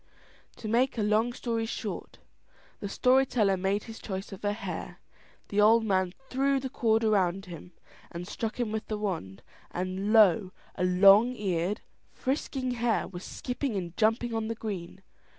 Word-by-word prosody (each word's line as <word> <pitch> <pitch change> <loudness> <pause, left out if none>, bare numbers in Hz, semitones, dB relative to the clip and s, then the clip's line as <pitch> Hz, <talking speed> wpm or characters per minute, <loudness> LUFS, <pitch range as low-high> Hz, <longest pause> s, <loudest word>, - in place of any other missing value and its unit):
To 220 - -7
make 245 +4 +2
a 215 - +1
long 215 +3 +2
story 230 -2 -2
short, - - -5 0.6
the 200 - -5
story 255 +5 +4
teller 215 -7 +2
made 195 +2 0
his 225 0 -9
choice 190 0 -5
of 195 - -9
a 205 - +1
hare; 210 - -6 0.5
the 205 +1 +2
old 225 +2 +5
man 185 -3 +1
threw 275 +1 +1
the 265 -1 -5
cord 225 -3 +2
round 195 -3 +2
him, 175 0 -10 0.5
struck 220 +5 -4
him 235 -3 -1
with 220 0 -3
the 215 - -2
wand, 165 - -4 0.3
and 185 +3 -3
lo! 205 -3 +5 0.2
a - - -3
long 200 +7 +6
eared, 190 -1 -1 0.3
frisking 265 -1 -2
hare 235 -1 0
was 180 -1 -8
skipping 250 -1 -3
and 175 -3 -4
jumping 225 +2 +1
on 225 -1 -1
the 230 - -3
green. 195 -4 -6
215 Hz, 165 wpm, -29 LUFS, 190-230 Hz, 0.6 s, long